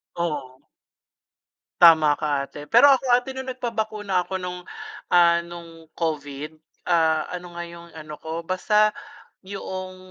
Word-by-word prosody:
Oo. 145 -7 -4 1.2
Tama 160 -3 +7
ka 145 -3 -1
ate. 145 +1 -9
Pero 285 - +7
ako 270 -1 +3
ate 250 +2 0
nung 265 0 -6
nagpabakuna 215 -7 -2
ako - - -6
nung, 180 0 -6 0.5
ah, 170 -1 +6
nung 165 -1 -11
Covid, 150 -1 -4 0.3
ah, 160 -2 +2
ano 180 -1 -8
nga 175 - -5
yung 170 0 -12
ano 155 -1 -9
ko, 160 +1 -5
basta 210 +5 +2 0.5
yoong, 185 -1 -7
170 Hz, 130 wpm, -23 LUFS, 155-190 Hz, 1.2 s, Tama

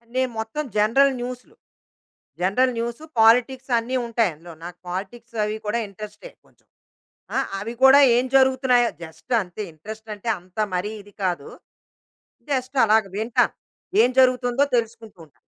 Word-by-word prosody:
నేను 260 -1 +1
మొత్తం 225 +8 -3
జనరల్ 265 +6 +4
న్యూస్‌లు. 250 0 -7 0.9
జనరల్ 250 +7 +2
న్యూ‌‌సు, 235 +5 -4 0.2
పాలిటిక్స్ 250 +3 +4
అన్ని 255 +3 -2
ఉంటాయి 230 -5 +1
అందులో. 165 +2 -12
నాకు 175 0 -8
పాలిటిక్స్ 225 +6 -7
అవి 210 +1 -2
కూడా 225 +3 0
ఇంట్రెస్టే, 210 - -10
కొంచెం. - - -30 0.7
ఆ! - - +3 0.2
అవి 225 +4 -5
కూడా 270 +2 +9 0.2
ఏం 250 - +1
జరుగుతున్నాయో, 260 -2 +4
జస్ట్ 160 +10 -7
అంతే. 185 +3 -7
ఇంట్రెస్టంటే, 215 +5 -8
అంత 180 +3 -25 0.2
మరీ 200 +4 -2
ఇది 205 0 -18
కాదు. 175 -6 -2 1.0
జస్ట్ 260 0 -2
అలాగా 215 -2 +3
వింటాను. 240 +3 +1 0.5
ఏం 250 - +3
జరుగుతుందో 255 +1 +3
తెలుసుకుంటూ 225 -3 -4
ఉంటా. 145 - -30
230 Hz, 135 wpm, -23 LUFS, 205-255 Hz, 1.0 s, కూడా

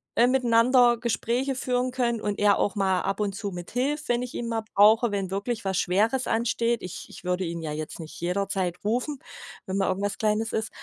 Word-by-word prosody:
äh, 240 - +5
miteinander 245 -1 +4
Gespräche 240 +3 -1
führen 250 0 0
können 240 -3 -1
und 205 -1 -2
er 205 -1 +3
auch 205 - 0
mal 190 -2 +1
ab 195 +1 -2
und 205 -2 -1
zu 200 +1 -4
mithilft, 250 - -3
wenn 240 0 +2
ich 250 - -6
ihn 235 - -3
mal 225 -1 -1
brauche, 220 +4 +6
wenn 195 -2 -2
wirklich 205 +3 -3
was 190 0 0
Schweres 220 +8 +1
ansteht. 230 0 0
Ich 180 - -7
ich - - -12
würde 180 +1 -1
ihn 170 0 -4
ja 155 - -3
jetzt 155 +2 -5
nicht 160 -1 -9
jederzeit 185 0 -1
rufen, 250 +7 -1 0.5
wenn 190 +1 -3
mal 195 - +1
irgendwas 195 +1 -2
Kleines 220 +1 0
ist. 220 0 -1
215 Hz, 205 wpm, -26 LUFS, 195-240 Hz, 0.5 s, brauche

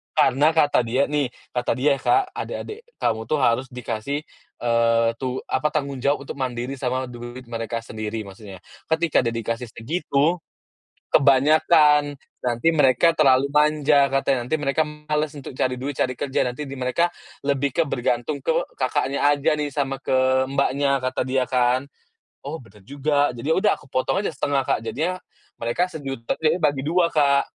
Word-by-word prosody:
Karena 150 +5 +4
kata 145 -5 +3
dia 130 +4 +1
nih 145 -3 +1 0.2
kata 125 0 -1
dia 140 +2 +2
ya, - - -13
Kak, 395 0 +3
"Adik-adik 430 +1 -6 0.2
kamu 110 0 +1
tuh 155 - +1
harus 130 +2 +2
dikasih, 125 +2 -4 0.4
eee, 115 -1 +3
tu 130 0 -3
apa, 130 +4 0
tanggung 140 -3 -2
jawab 140 +1 0
untuk - - -6
mandiri 125 0 -3
sama 130 0 -1
duit 120 +1 -9
mereka 115 0 -3
sendiri," 110 0 -5
maksudnya 95 -1 -11 0.3
ketika 160 -1 +2
dia 115 - 0
dikasih 115 +1 -3
segitu, 150 +6 0 0.7
kebanyakan, 150 +1 +4 0.2
nanti 120 +4 0
mereka 145 +1 +4
terlalu 135 -2 +4
manja, 150 -1 +4
katanya, 135 -2 0
"Nanti 140 - -1
mereka 145 +2 +1
males 150 0 -3
untuk 140 - -8
cari 130 -1 +1
duit, 135 +2 -5
cari 130 0 0
kerja, 135 0 -2
nanti 125 +4 -4
di 135 - -7
mereka 130 +8 +1 0.3
lebih 140 -1 0
ke 170 - +3
bergantung 130 0 -1
ke 160 +4 -1 0.2
kakaknya 135 +1 0
aja 145 +1 +2
nih, 150 - -1
sama 135 -2 -1
ke 130 0 +2
mbaknya," 140 0 +1
kata 130 0 -1
dia 130 0 +1
kan. 125 0 +2 0.6
"Oh, 145 +3 -5
bener 105 -2 -18
juga," 145 -1 +1
jadi 135 +6 -2
ya - - +4
udah 210 - +3
aku 135 - -19
potong 180 +9 0
aja - - -1
setengah, 140 -3 0
Kak, - - 0
jadinya 160 +11 -2 0.4
mereka 175 +11 -1
sejuta, 135 -7 -4
jadi 160 +3 +2
bagi 145 -2 +2
dua, 170 +1 +2
Kak, 140 -2 +3
135 Hz, 170 wpm, -23 LUFS, 125-150 Hz, 0.7 s, Karena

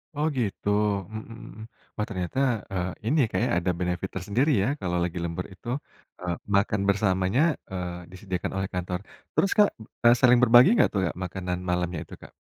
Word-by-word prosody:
Oh 150 +1 0
gitu, 105 -3 -2 0.4
mmm, 110 +1 -8 0.6
wah 105 - -1
ternyata, 90 +3 -4 0.4
eee, 90 -1 -1 0.2
ini 145 +8 +2
ya - - +1
Kak 95 - 0
ya, - - -1
ada 90 +1 +1
benefit 90 +1 -2
tersendiri 105 - +1
ya - - +1
kalau 90 -1 -1
lagi 85 0 -3
lembur 85 +2 -3
itu. 90 +4 -16 0.5
Eee, 90 -1 -2 0.2
makan 100 0 +2
bersamanya, 95 +3 +2 0.3
eee, 90 -1 -5
disediakan 95 -1 -4
oleh 95 0 -2
kantor. 90 0 -2 0.3
Terus 195 - +2
Kak, 210 -1 +6 0.4
e - - +9
saling 125 -1 +6
berbagi 120 - +8
nggak - - +4
tuh, 100 - +1
a - - -3
makanan 90 0 -3
malamnya 90 -1 -1
itu, - - -14
Kak? - - -13
95 Hz, 180 wpm, -26 LUFS, 90-110 Hz, 0.6 s, e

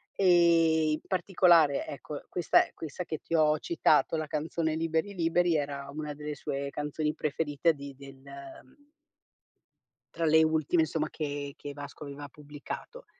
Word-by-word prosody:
e 165 -4 +4
in 155 - -2
particolare, 175 -5 +3
ecco, 145 +1 -7
questa 175 - +3
è - - -22
questa 160 +3 -6
che 160 - -4
ti 165 - -4
ho 155 -1 +4
citato, 165 -1 +2
la 155 -1 -2
canzone 160 +1 -2
"Liberi 165 +4 -1
Liberi" 170 -1 +2
era 140 -1 -4
una 150 0 -5
delle 150 0 -6
sue 140 -1 -4
canzoni 150 +2 -2
preferite 150 +2 0
di 140 -1 -9
del 135 -1 -13 1.9
tra 165 - -1
le 160 0 +5
ultime, 160 +1 +2
insomma, 155 0 -2
che 145 -2 -5
che 145 -1 -7
Vasco 145 +1 -9
aveva 145 0 -8
pubblicato. 150 - -9
155 Hz, 145 wpm, -29 LUFS, 145-165 Hz, 1.9 s, le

